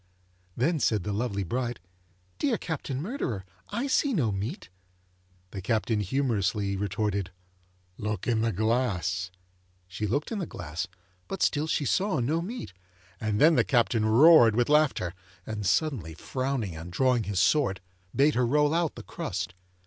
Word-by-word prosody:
Then 155 +6 +1
said 110 -6 +1
the 105 - -2
lovely 100 -2 -1
bride, 120 +5 -2 0.6
'Dear 260 -6 +1
Captain 145 -5 -4
Murderer, 150 - -3 0.2
I 235 +6 -2
see 280 0 +2
no 125 - +1
meat.' 105 - -4 0.8
The 100 - -6
Captain 110 +2 0
humorously 105 -3 0
retorted, 100 0 -1 0.7
'Look 105 -3 -3
in 115 -2 +1
the 115 0 +1
glass.' 95 -5 0 0.6
She 90 +4 -3
looked 145 - -1
in 220 - -2
the 175 - -3
glass, 80 0 -5 0.4
but 195 - -2
still 150 +2 +1
she 150 - 0
saw 190 0 +1
no 150 +8 0
meat, 220 - -6 0.5
and 105 -1 -1
then 160 +3 +7
the - - +4
Captain 120 -3 +2
roared 120 -1 +7
with 120 +2 +2
laughter, 150 - +2 0.3
and 105 -3 -3
suddenly 100 - 0
frowning 130 -3 -3
and 80 +3 -8
drawing 125 +2 +2
his 100 -2 -1
sword, 115 -3 +3 0.4
bade 145 +3 +4
her 125 0 +2
roll 150 +3 +3
out 170 -2 0
the - - -8
crust. 95 - -4
115 Hz, 155 wpm, -28 LUFS, 100-150 Hz, 0.8 s, then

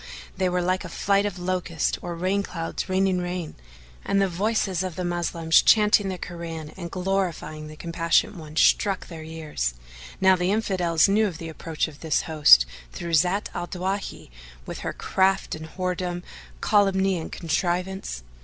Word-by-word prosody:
they 185 -1 +1
were 180 0 0
like 185 +1 0
a - - -7
flight 200 +1 +1
of 195 -3 -5
locusts 180 -3 -1
or 175 -1 -5
rain 185 +4 0
clouds 165 -1 -4
raining 190 0 +2
rain, 180 -2 -4 0.5
and 200 - +1
the 195 - +3
voices 190 0 0
of 185 -3 -4
the 180 - -3
Moslems 170 -2 +2
chanting 210 -2 +5
the 185 - -3
Koran 165 -3 -6
and 175 -3 -6
glorifying 180 -5 -2
the 155 - -10
Compassionate 170 +5 +1
One, 155 -3 -10
struck 195 +3 +3
their 165 -2 -8
ears. 155 - -3 0.4
Now 190 0 +6
the 180 0 0
Infidels 180 -6 +2
knew 210 +2 +3
of 175 -5 -6
the 165 0 -7
approach 160 0 -3
of 150 -2 -12
this 160 -3 0
host 150 - +7 0.3
through 170 - -5
Zat 180 +6 +2
al 175 - -4
Dawahi 190 - -4 0.3
with - - -6
her - - -3
craft 190 0 +1
and 160 0 -6
whoredom,[FN#435] 180 0 -3 0.4
calumny 195 -2 +3
and 160 - -7
contrivance. 175 - -2
180 Hz, 165 wpm, -25 LUFS, 165-190 Hz, 0.5 s, host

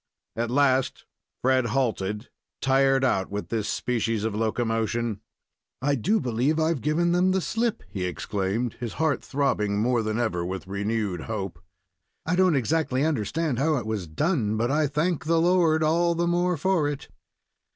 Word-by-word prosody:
At 115 +1 -1
last 130 0 +2 0.4
Fred 130 -1 +3
halted, 110 -3 -1 0.3
tired 135 0 +3
out 95 -7 +1
with 100 +1 -5
this 110 -2 -1
species 115 -3 -1
of 110 -1 -1
locomotion. 115 0 -1 0.6
"I 145 +3 +1
do 195 - +1
believe 130 +5 0
I've 160 -3 +1
given 165 +5 +1
them 180 +2 +3
the 190 - +2
slip," 225 +4 -1
he 95 -2 -4
exclaimed, 100 +5 -2
his 120 -3 -4
heart 160 -2 0
throbbing 125 -8 0
more 120 +2 +2
than 110 0 -2
ever 110 -8 0
with 95 +2 -4
renewed 100 -2 -2
hope. 100 -6 -4 0.7
"I 175 - +1
don't 185 -3 +4
exactly 140 0 +1
understand 155 0 -1
how 150 +2 +2
it 120 - -3
was 110 -5 -3
done, 110 - 0
but 120 +3 0
I 150 +1 +2
thank 155 +4 -1
the 165 +1 +3
Lord 165 -2 +3
all 170 +2 +2
the 170 +1 +1
more 175 0 +1
for 170 -1 +1
it." 145 -2 -4
130 Hz, 160 wpm, -26 LUFS, 110-160 Hz, 0.7 s, don't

